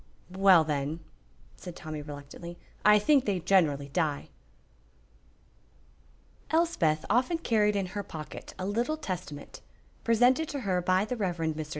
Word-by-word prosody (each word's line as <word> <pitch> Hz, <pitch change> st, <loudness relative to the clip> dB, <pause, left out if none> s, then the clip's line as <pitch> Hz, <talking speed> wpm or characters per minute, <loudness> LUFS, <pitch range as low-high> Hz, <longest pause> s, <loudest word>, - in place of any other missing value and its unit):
"Well, 190 Hz, -4 st, +6 dB
then," 150 Hz, +1 st, -2 dB, 0.6 s
said 175 Hz, -2 st, -9 dB
Tommy, 155 Hz, -3 st, -6 dB
reluctantly, 145 Hz, +4 st, -9 dB, 0.3 s
"I 210 Hz, 0 st, +7 dB
think 265 Hz, +6 st, +3 dB
they 195 Hz, -3 st, 0 dB
generally 160 Hz, -6 st, +2 dB
die." 150 Hz, -1 st, -1 dB, 2.2 s
Elspeth 315 Hz, -, +1 dB
often 250 Hz, -, +2 dB
carried 210 Hz, -8 st, +1 dB
in 195 Hz, -1 st, 0 dB
her 205 Hz, -, -2 dB
pocket 155 Hz, -6 st, -9 dB
a 185 Hz, -, -4 dB
little 235 Hz, +10 st, -1 dB
Testament, 175 Hz, -, -7 dB, 0.4 s
presented 245 Hz, +7 st, +3 dB
to 285 Hz, -2 st, -4 dB
her 185 Hz, -5 st, 0 dB
by 185 Hz, +3 st, +2 dB
the 250 Hz, +2 st, -4 dB
Rev. 185 Hz, -5 st, -1 dB
Mr. 160 Hz, -2 st, -2 dB
185 Hz, 130 wpm, -29 LUFS, 155-220 Hz, 2.2 s, I